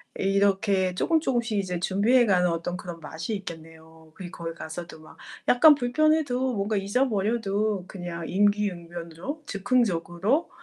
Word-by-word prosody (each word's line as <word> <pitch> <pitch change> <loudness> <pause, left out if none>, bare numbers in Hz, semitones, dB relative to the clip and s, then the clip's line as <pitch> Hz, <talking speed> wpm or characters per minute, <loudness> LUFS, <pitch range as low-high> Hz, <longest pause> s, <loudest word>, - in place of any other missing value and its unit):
이렇게 195 -1 +1
쪼금쪼금씩 240 - +1
이제 180 -3 -3
준비해 220 +8 +3
가는 180 -3 +3
어떤 170 +2 -3
그런 175 -2 -8
맛이 160 +7 -5
있겠네요. 160 -3 -11
그리고 180 -2 -9
거기 165 0 -4
가서도 170 0 -8
막 - - -16 0.3
약간 295 +4 +7
불편해도 260 -1 +1
뭔가 205 +1 -1
잊어버려도 205 -2 0
그냥 175 -3 -6
임기응변으로, 185 - -2
즉흥적으로 200 - 0
195 Hz, 340 characters per minute, -26 LUFS, 175-235 Hz, 0.3 s, 약간